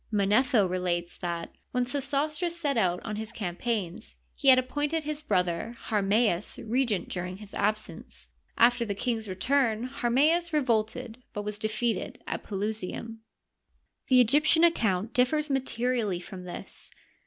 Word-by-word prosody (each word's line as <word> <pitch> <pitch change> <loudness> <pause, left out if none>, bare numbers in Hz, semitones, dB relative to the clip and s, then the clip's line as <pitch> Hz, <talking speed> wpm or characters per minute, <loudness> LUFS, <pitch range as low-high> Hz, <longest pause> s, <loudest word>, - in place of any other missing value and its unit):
Manetho 210 +2 +3
relates 175 -1 -2
that, 170 -1 -4 0.2
when 250 -1 +1
Sesostris 290 +6 -1
set 290 -5 0
out 180 -6 +2
on 215 -2 -4
his 220 +1 -5
campaigns, 185 - -3 0.2
he - - -4
had 260 -1 +9
appointed 290 +5 -1
his 300 0 -3
brother 185 - -1
Harmals 210 -2 +1
regent 230 -3 0
during 180 0 -4
his 210 -1 -13
absence. 175 - -3 0.3
After 240 0 +5
the 205 -3 -3
king's 225 0 -2
return 235 +3 +1
Harmsds 290 +7 +2
re 300 - +3
volted, 225 -1 -1 0.2
but 205 - -4
was 210 0 -4
defeated 220 +1 -1
at - - -3
Pelusium. 215 +2 -4 0.9
The 255 -1 +5
Egyptian 300 +7 +5
account 220 - +2
differs 295 +4 +2
materially 245 -7 0
from 180 +1 -9
this. 175 - -8
225 Hz, 135 wpm, -28 LUFS, 195-265 Hz, 0.9 s, had